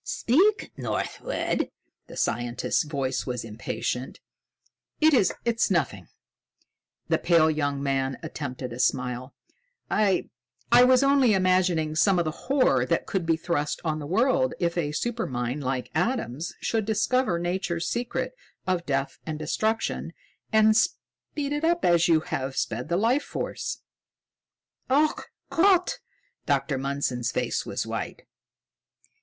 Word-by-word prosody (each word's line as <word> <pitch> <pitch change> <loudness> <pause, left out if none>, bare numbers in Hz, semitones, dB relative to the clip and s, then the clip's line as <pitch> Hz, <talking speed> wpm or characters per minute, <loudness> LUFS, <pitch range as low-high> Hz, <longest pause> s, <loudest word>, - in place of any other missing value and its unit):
"Speak, 385 - +2
Northwood!" - - -2 0.4
The - - -11
scientist's 120 +5 0
voice 135 -3 -2
was 125 -2 -3
impatient. 115 +3 -4 0.8
"It 315 0 +5
is 235 -8 +5 0.4
nothing!" 125 - -1 1.0
The - - +2
pale 165 -2 +4
young 145 -2 -1
man 135 -1 0
attempted 130 -3 -5
a 120 - -8
smile. 125 0 -1 0.6
"I 205 -3 +2 0.4
was 250 +2 +7
only 275 -6 +4
imagining 185 -4 +2
some 190 +4 +4
of 175 - +1
the 155 - -1
horror 250 - +2
that - - 0
could 185 -4 -2
be 165 -1 +3
thrust 155 -3 -1
on 155 -1 0
the 145 - -6
world 260 - +2
if 170 -1 0
a 165 -4 0
supermind 145 - -2
like 130 -1 -3
Adam's 165 - -1
should 225 -2 0
discover 220 -1 +1
Nature's 175 -1 -2
secret 240 0 -2 0.3
of 180 -2 -1
death 140 -1 -1
and 155 -1 -3
destruction 215 +9 -1 0.4
and 220 0 +5
speed 285 +5 -2
it 295 +1 -2
up 340 +1 +2
as 170 -1 +4
you 160 -2 +4
have 130 -2 -4
sped 115 +3 -2
the 170 - +1
life 235 +8 +2
force." - - -4 1.1
"Ach 295 +4 +2 0.3
Gott!" 365 +1 +3 0.5
Dr. 140 -1 +1
Mundson's 135 -3 -1
face - - -1
was - - -2
white. - - -5
170 Hz, 130 wpm, -26 LUFS, 135-225 Hz, 1.1 s, was